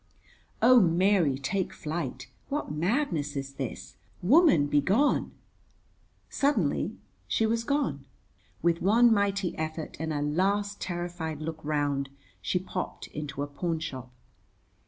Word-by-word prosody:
Oh, 250 Hz, +1 st, +8 dB
Mary, 175 Hz, -4 st, +3 dB
take 185 Hz, +8 st, -2 dB
flight. 150 Hz, -5 st, -4 dB, 0.2 s
What 290 Hz, -, -2 dB
madness 165 Hz, -, 0 dB
is 135 Hz, 0 st, -4 dB
this? -, -, -6 dB, 0.3 s
Woman, 275 Hz, -, +5 dB
be 145 Hz, 0 st, +2 dB
gone. 225 Hz, -, +2 dB, 1.0 s
Suddenly 285 Hz, +1 st, 0 dB, 0.3 s
she 225 Hz, -, +1 dB
was 230 Hz, +1 st, 0 dB
gone. 205 Hz, -, -1 dB, 0.6 s
With 170 Hz, 0 st, +2 dB
one 230 Hz, +5 st, +5 dB
mighty 200 Hz, -3 st, 0 dB
effort 160 Hz, 0 st, -4 dB
and 160 Hz, 0 st, -2 dB
a 145 Hz, -1 st, -1 dB
last 200 Hz, +6 st, 0 dB
terrified 175 Hz, -3 st, -4 dB
look 160 Hz, 0 st, -5 dB
round, 145 Hz, -2 st, 0 dB, 0.3 s
she 95 Hz, -, 0 dB
popped 185 Hz, 0 st, -5 dB
into 145 Hz, -2 st, -5 dB
a -, -, -4 dB
pawnshop. 145 Hz, -4 st, -4 dB
170 Hz, 120 wpm, -28 LUFS, 145-200 Hz, 1.0 s, Oh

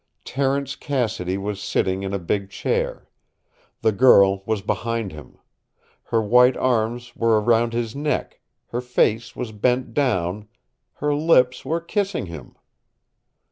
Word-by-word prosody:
Terence 135 Hz, 0 st, -1 dB
Cassidy 110 Hz, -, -2 dB
was 100 Hz, 0 st, -4 dB
sitting 95 Hz, 0 st, 0 dB
in 95 Hz, -1 st, -4 dB
a 100 Hz, -, -1 dB
big 95 Hz, +2 st, -2 dB
chair. -, -, -2 dB, 0.8 s
The 110 Hz, -, +4 dB
girl 100 Hz, -4 st, +5 dB
was 110 Hz, -3 st, -1 dB
behind 115 Hz, -1 st, -2 dB
him. 75 Hz, -1 st, -12 dB, 0.7 s
Her 115 Hz, -1 st, 0 dB
white 125 Hz, +4 st, +5 dB
arms 120 Hz, 0 st, -1 dB
were 115 Hz, -2 st, +3 dB
around 115 Hz, +1 st, +2 dB
his 115 Hz, 0 st, -2 dB
neck, 150 Hz, +1 st, -2 dB, 0.3 s
her 120 Hz, -, -3 dB
face 115 Hz, -2 st, 0 dB
was 120 Hz, -3 st, -5 dB
bent 125 Hz, +4 st, 0 dB
down, 105 Hz, -7 st, 0 dB, 0.5 s
her 150 Hz, 0 st, -1 dB
lips 145 Hz, -5 st, +3 dB
were 160 Hz, +5 st, -1 dB
kissing 195 Hz, -, -2 dB
him. 80 Hz, -7 st, -10 dB
115 Hz, 135 wpm, -22 LUFS, 100-130 Hz, 0.8 s, girl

